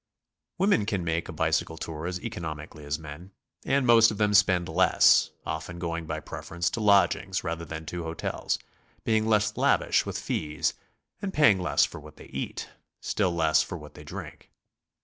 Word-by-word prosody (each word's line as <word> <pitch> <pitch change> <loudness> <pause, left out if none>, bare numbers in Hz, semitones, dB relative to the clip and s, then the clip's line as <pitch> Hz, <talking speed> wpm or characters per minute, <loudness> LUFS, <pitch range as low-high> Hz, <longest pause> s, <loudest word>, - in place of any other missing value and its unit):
Women 185 - +2
can 100 -5 -1
make 85 +1 -2
a - - -3
bicycle 80 0 0
tour 80 0 -5
as 90 0 -3
economically 80 -8 -6
as 75 +1 -1
men, 80 +5 -10 0.3
and 135 -1 +1
most 115 -2 +7
of 105 - -5
them 105 -1 +2
spend 95 -4 +4
less, 90 +3 +5 0.2
often 90 - -5
going 85 -1 -4
by 80 0 -3
preference 85 +3 -3
to - - -3
lodgings 95 -2 +3
rather 85 -1 -3
than 80 +1 -7
to 85 +2 -5
hotels, 80 0 -3 0.5
being 110 -1 +1
less 105 -1 +2
lavish - - +2
with - - -4
fees, 75 0 -2 0.5
and 200 -2 -3
paying 110 -11 +5
less 90 - +3
for - - -9
what 75 +1 -14
they - - -12
eat, 70 - -5 0.3
still 95 -4 0
less 80 -2 +3
for - - -5
what - - -12
they - - -12
drink. - - -9
85 Hz, 175 wpm, -27 LUFS, 80-105 Hz, 0.5 s, most